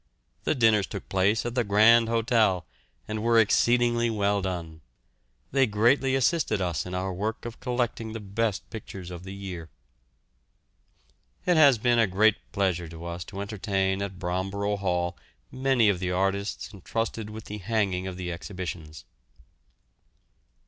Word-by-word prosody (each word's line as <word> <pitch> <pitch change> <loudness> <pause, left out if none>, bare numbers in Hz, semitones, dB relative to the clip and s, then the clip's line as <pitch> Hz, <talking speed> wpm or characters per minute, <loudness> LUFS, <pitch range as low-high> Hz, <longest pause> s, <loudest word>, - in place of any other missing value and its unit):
The - - +2
dinners 110 -6 +4
took - - -7
place 95 +4 +2
at 120 - -2
the 125 -1 +1
Grand 110 +3 +5
Hotel, 115 -6 +2 0.4
and 110 0 -3
were 115 +1 +3
exceedingly 120 +2 +3
well 100 -2 +1
done. 85 -4 -5 0.7
They 135 -1 +3
greatly 125 +5 +3
assisted 135 - +1
us 90 -3 -2
in 90 - -5
our 95 +1 -2
work 105 +6 -3
of 120 -1 -7
collecting 120 -3 -2
the 115 - -5
best 105 0 -2
pictures 95 -5 -8
of 85 -1 -7
the 95 - -7
year. 90 -5 -7 1.8
It 180 - +3
has 140 -6 +7
been 120 +1 +2
a 115 - +4
great 105 +3 +3
pleasure 95 -4 0
to 85 +1 -9
us 85 0 -5
to 100 -1 -7
entertain 100 -2 -1
at 100 -2 -4
Bromborough 95 +3 -2
Hall 90 -2 -1 0.4
many 130 -3 +2
of 100 -3 +2
the 90 -1 -2
artists 95 +4 -1
entrusted 110 +3 -3
with 110 0 -8
the 105 0 -6
hanging 95 -2 -1
of 90 -1 -6
the 90 -1 -4
exhibitions. 85 -3 -7
100 Hz, 150 wpm, -27 LUFS, 95-115 Hz, 1.8 s, has